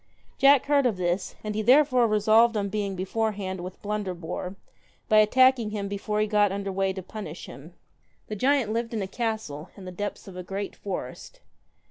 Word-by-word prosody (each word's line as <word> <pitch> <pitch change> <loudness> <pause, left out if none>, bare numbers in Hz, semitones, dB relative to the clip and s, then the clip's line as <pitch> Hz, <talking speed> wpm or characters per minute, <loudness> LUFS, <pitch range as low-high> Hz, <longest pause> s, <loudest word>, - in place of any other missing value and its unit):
Jack 275 -1 +6
heard 280 -2 +3
of 220 -6 -1
this, 180 +1 -2
and 215 0 -3
he 215 - -1
therefore 255 0 +5
resolved 220 +2 +4
on 200 -1 -1
being 200 -2 -2
beforehand 195 -1 -2
with 180 +1 -8
Blunderbore, 185 -3 -4 0.5
by 215 - +5
attacking 250 +1 +4
him 205 -1 -4
before 205 +1 -3
he 215 - +3
got 205 -2 +2
under 195 0 -3
way 195 0 0
to 190 -1 -6
punish 210 +3 -8
him. - - -12 0.5
The 215 - -5
giant 255 -1 +1
lived 230 0 -2
in 210 - -1
a - - -4
castle 220 -9 -4
in 195 - -10
the 185 - -6
depths 205 +3 -5
of 190 - -10
a 180 - -5
great 195 +2 -5
forest. 180 -10 -7
210 Hz, 185 wpm, -26 LUFS, 190-225 Hz, 0.5 s, Jack